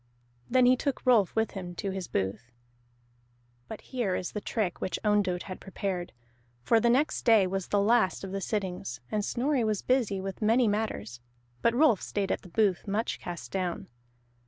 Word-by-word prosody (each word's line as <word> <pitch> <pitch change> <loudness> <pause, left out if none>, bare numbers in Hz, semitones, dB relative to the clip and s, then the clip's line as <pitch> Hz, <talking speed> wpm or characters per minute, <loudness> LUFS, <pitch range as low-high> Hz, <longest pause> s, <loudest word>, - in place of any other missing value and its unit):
Then 255 0 +4
he 250 +1 +6
took 275 +1 -3
Rolf 230 -7 +4
with 220 0 +1
him 180 -3 -7
to 195 +1 -3
his 190 -2 -4
booth. 100 +5 -3 1.2
But 220 - -8
here 235 -8 -2
is 180 - -3
the 210 - -4
trick 205 -5 -2
which 185 - -2
Ondott 205 -4 +1
had 185 - -8
prepared. 190 -2 -4 0.5
For 225 - +4
the 235 - +3
next 270 +6 +2
day 225 -5 +6
was 190 0 -3
the 205 - +2
last 205 -2 +2
of 195 - -5
the 195 0 -3
sittings, 180 - -3
and 210 -1 0
Snorri 255 +4 0
was 215 -2 -1
busy 240 -7 +1
with 195 +1 -6
many 230 +3 +4
matters; 205 - -2 0.4
but 235 - +2
Rolf 255 -7 +4
stayed 200 -2 -2
at - - -1
the 180 - -13
booth, 200 0 +1
much 210 +3 -1
cast 175 -2 -7
down. 180 -7 -3
205 Hz, 180 wpm, -29 LUFS, 185-230 Hz, 1.2 s, he